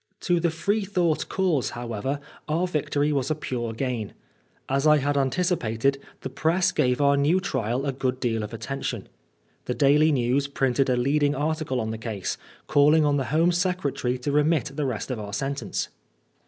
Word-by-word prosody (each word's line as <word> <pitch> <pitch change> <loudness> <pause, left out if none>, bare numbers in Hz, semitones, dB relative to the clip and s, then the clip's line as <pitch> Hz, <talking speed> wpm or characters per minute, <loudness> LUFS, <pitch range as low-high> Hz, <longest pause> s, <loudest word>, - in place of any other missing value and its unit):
To 175 -2 +2
the 170 0 +2
Freethought 180 -1 0
cause, 180 -9 +1
however, 120 +4 -3 0.3
our 165 +4 +1
victory 150 -3 0
was 135 -2 0
a 155 - +1
pure 120 -6 -3
gain. 115 -2 -3 0.5
As 135 +3 +1
I 150 0 +6
had 145 0 0
anticipated, 140 -4 +1 0.2
the - - -4
press 175 +7 +1
gave 125 -5 +1
our 140 0 +4
new 145 +6 +3
trial 130 - -2
a 140 - 0
good 130 -1 -2
deal 115 -3 0
of 105 - -5
attention. 135 +4 -4 0.6
The 125 - -2
Daily 150 +2 +4
News 135 +1 +1
printed 135 -1 +1
a 125 - +2
leading 145 +3 +2
article 150 -2 -1
on 110 -1 -2
the 110 - -5
case, 110 -4 -4 0.3
calling 150 +1 +4
on 145 -1 +2
the 135 - -1
Home 165 +5 +2
Secretary 175 -8 -1
to 125 +3 -3
remit 150 -1 +2
the 140 -2 -1
test 120 +2 -4
of 125 - -3
our 100 -1 -7
sentence. 135 +6 -3
140 Hz, 175 wpm, -25 LUFS, 125-155 Hz, 0.6 s, I